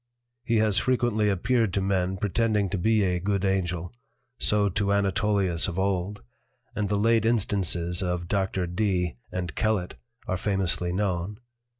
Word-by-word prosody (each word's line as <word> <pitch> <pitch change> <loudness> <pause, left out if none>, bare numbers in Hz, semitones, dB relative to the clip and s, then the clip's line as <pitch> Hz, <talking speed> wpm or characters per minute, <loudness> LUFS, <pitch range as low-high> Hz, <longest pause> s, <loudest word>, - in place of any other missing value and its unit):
He 115 -2 0
has 110 -2 +3
frequently 120 -4 +1
appeared 110 +3 +1
to - - +2
Men 95 -1 0
pretending 105 0 0
to 100 - -1
be 110 +3 +2
a 90 -2 0
good 100 +1 -1
Angel, 90 -2 -1 0.5
so 105 -1 +3
to 100 +1 -1
Anatolius 100 -3 +1
of 85 - -5
old; 95 0 -1 0.5
and 105 -2 -1
the 105 - +1
late 115 +1 +3
instances 95 -6 +1
of 90 -2 -2
Dr. 95 -1 -1
Dee 90 - -1
and 90 -3 -4
Kellet 105 - -1 0.3
are 95 - -1
famously 95 -3 0
known. 95 0 -2
100 Hz, 150 wpm, -26 LUFS, 90-105 Hz, 0.5 s, has